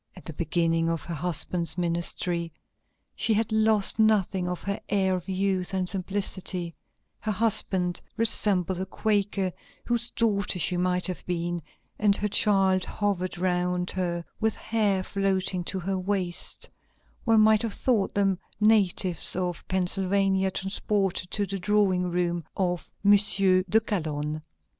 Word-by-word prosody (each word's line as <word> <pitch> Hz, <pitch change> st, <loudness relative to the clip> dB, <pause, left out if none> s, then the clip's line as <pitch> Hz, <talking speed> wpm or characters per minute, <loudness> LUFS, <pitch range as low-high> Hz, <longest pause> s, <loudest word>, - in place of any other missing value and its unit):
At -, -, -14 dB
the 160 Hz, -, -7 dB
beginning 165 Hz, +1 st, 0 dB
of 165 Hz, -1 st, -2 dB
her 170 Hz, -, -6 dB
husband's 170 Hz, +1 st, -2 dB
ministry 170 Hz, 0 st, -1 dB, 0.6 s
she 220 Hz, -, +1 dB
had 225 Hz, +1 st, 0 dB
lost 220 Hz, -1 st, +3 dB
nothing 205 Hz, -4 st, +2 dB
of 180 Hz, -, -5 dB
her 200 Hz, 0 st, -3 dB
air 190 Hz, -2 st, +1 dB
of 180 Hz, +1 st, -4 dB
youth 190 Hz, 0 st, -1 dB
and 185 Hz, -1 st, -1 dB
simplicity; 185 Hz, -2 st, 0 dB, 0.5 s
her 215 Hz, -, -2 dB
husband 190 Hz, -4 st, +1 dB, 0.2 s
resembled 190 Hz, -5 st, +4 dB
a 190 Hz, -, -4 dB
Quaker 200 Hz, -2 st, -1 dB, 0.3 s
whose 235 Hz, 0 st, 0 dB
daughter 205 Hz, -5 st, 0 dB
she 180 Hz, +2 st, +1 dB
might 180 Hz, 0 st, 0 dB
have 185 Hz, -2 st, -2 dB
been, 175 Hz, -1 st, -2 dB, 0.4 s
and 205 Hz, -1 st, +4 dB
her 210 Hz, -, -1 dB
child 195 Hz, -2 st, +2 dB
hovered 190 Hz, -4 st, -2 dB
round 180 Hz, 0 st, 0 dB
her 175 Hz, -2 st, -3 dB
with 220 Hz, -1 st, 0 dB
hair 205 Hz, -4 st, 0 dB
floating 190 Hz, -2 st, -1 dB
to 190 Hz, -, -3 dB
her 190 Hz, +1 st, -2 dB
waist; 185 Hz, -2 st, -2 dB, 0.6 s
one 225 Hz, -2 st, +4 dB
might 215 Hz, 0 st, +5 dB
have 230 Hz, -3 st, -3 dB
thought 230 Hz, -7 st, 0 dB
them 195 Hz, -2 st, +1 dB, 0.2 s
natives 200 Hz, -5 st, +2 dB
of 180 Hz, -2 st, -3 dB
Pennsylvania 190 Hz, +1 st, +1 dB
transported 195 Hz, -1 st, -2 dB
to 205 Hz, +1 st, -1 dB
the 195 Hz, 0 st, -4 dB
drawing 190 Hz, -2 st, +1 dB
room 175 Hz, -1 st, -1 dB
of 180 Hz, -2 st, -2 dB, 0.2 s
M. 205 Hz, -, +6 dB
de 195 Hz, 0 st, +3 dB
Calonne." 155 Hz, -7 st, -3 dB
190 Hz, 140 wpm, -26 LUFS, 180-205 Hz, 0.6 s, M